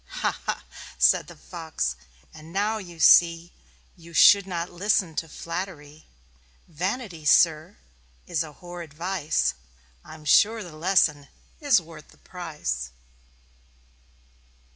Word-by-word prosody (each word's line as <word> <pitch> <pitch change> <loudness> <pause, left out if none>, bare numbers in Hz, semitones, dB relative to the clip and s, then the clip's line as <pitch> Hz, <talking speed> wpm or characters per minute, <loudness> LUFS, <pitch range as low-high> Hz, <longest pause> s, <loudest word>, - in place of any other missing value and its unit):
"Ha - - +2 0.2
ha!" - - -2 0.3
said 60 0 +3
the - - -12
Fox. 160 - -4 0.4
"And 155 +1 -13
now 210 +4 -1
you 175 -4 -11
see 170 +2 +5 0.4
You 170 -1 -15
should 200 +4 +7
not 175 -1 -4
listen 185 -2 0
to 165 - -3
flattery. 165 -3 -7 0.6
Vanity, 180 - -4
Sir 160 +4 +3 0.5
is 165 -2 -1
a 155 -2 -6
horrid 175 -2 -10
vice 170 - -1 0.5
I'm 155 -1 -13
sure 215 +8 +4
the 170 -4 -11
lesson 155 -4 +2 0.3
is 285 - +4
worth 160 -2 -13
the - - -21
price." 150 - -5
170 Hz, 120 wpm, -25 LUFS, 155-185 Hz, 0.6 s, should